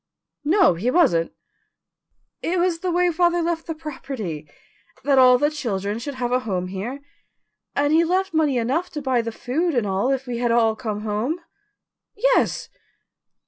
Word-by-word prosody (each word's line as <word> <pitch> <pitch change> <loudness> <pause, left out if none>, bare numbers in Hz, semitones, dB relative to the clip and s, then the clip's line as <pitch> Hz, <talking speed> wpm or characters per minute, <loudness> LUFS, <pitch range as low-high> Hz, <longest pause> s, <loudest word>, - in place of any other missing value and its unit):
"No, 350 - +5
he 190 +9 -1
wasn't." 250 - +3 1.1
"It 355 +2 -1
was 345 -1 +1
the 365 - -2
way 355 0 +2
father 345 +1 +2
left 335 0 -2
the 325 - -3
property 260 - -6 0.5
that 275 0 +4
all 250 -1 +7
the 295 +4 +1
children 210 -7 -3
should 280 +3 -6
have 245 -1 -2
a 250 - +3
home 185 -7 -3
here 220 +9 -5 0.7
and 290 +1 +2
he 330 +1 +5
left 375 +3 0
money 305 -5 +2
enough 275 +10 0
to 300 - -4
buy 260 -3 +2
the 230 0 -4
food 300 +8 -1
and 240 -3 +1
all 195 +5 0
if 270 -1 -1
we 240 -2 -4
had 240 -1 +1
all 225 -2 +3
come 215 -4 -4
home." 220 +10 -2 0.8
"Yes." - - +2
265 Hz, 170 wpm, -23 LUFS, 225-330 Hz, 1.1 s, all